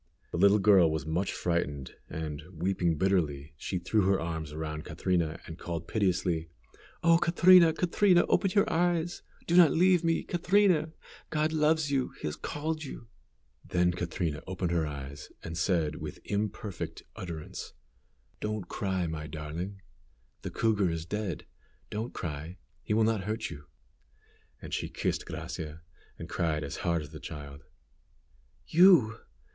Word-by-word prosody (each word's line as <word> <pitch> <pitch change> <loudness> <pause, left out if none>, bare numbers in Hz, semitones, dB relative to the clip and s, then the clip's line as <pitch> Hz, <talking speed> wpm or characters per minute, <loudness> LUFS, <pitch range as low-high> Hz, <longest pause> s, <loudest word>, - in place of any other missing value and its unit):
The 85 - -2
little 100 +2 +6
girl 95 -4 +6
was 80 -1 -2
much 85 +5 -1
frightened, 75 -6 -2 0.2
and, 75 -2 -5
weeping 90 -1 0
bitterly, 80 -5 0
she 90 +6 -3
threw 95 +5 +1
her 95 -1 +3
arms 80 -2 -4
around 75 0 -4
Catrina 85 -1 -1
and 80 +1 -9
called 85 -1 -5
piteously, 90 -5 0 0.5
"Oh, 165 0 +6
Catrina! 175 0 +7
Catrina! 180 +2 +3
open 195 - +2
your 200 - +4
eyes; 175 0 0 0.2
do 170 - +1
not 175 -3 +8
leave 180 0 +4
me, 165 -1 +1
Catrina; 180 -3 +2 0.4
God 155 +1 0
loves 155 -1 +2
you, 135 -2 0
He - - -6
has 75 - -2
called 155 +2 -3
you!" 125 -4 -9 0.5
Then 90 0 +2
Catrina 85 -3 -3
opened 90 -2 -2
her 85 -3 +1
eyes, 70 -1 -7
and 80 - -5
said, 85 -3 +1
with - - -6
imperfect 105 -2 -3
utterance, 85 -4 -7 0.7
"Don't 105 -3 -3
cry, 95 -3 -1
my 80 -1 -4
darling. 80 +6 -6 0.6
The - - -4
cougar 105 -5 +1
is 80 -1 -3
dead. 100 -3 -3 0.5
Don't 110 +4 -3
cry; 80 +3 -5 0.2
he 105 - -1
will 110 - +4
not 110 -3 +1
hurt 110 +1 -3
you." 70 0 -9 1.0
And - - -7
she - - -2
kissed - - -2
Gracia, 80 +1 -6 0.4
and - - -7
cried 80 -2 -1
as 70 - -5
hard 85 -2 0
as 75 - -11
the 80 - -8
child. 75 -3 -8 1.0
"You! 160 - +6
90 Hz, 150 wpm, -30 LUFS, 80-130 Hz, 1.0 s, not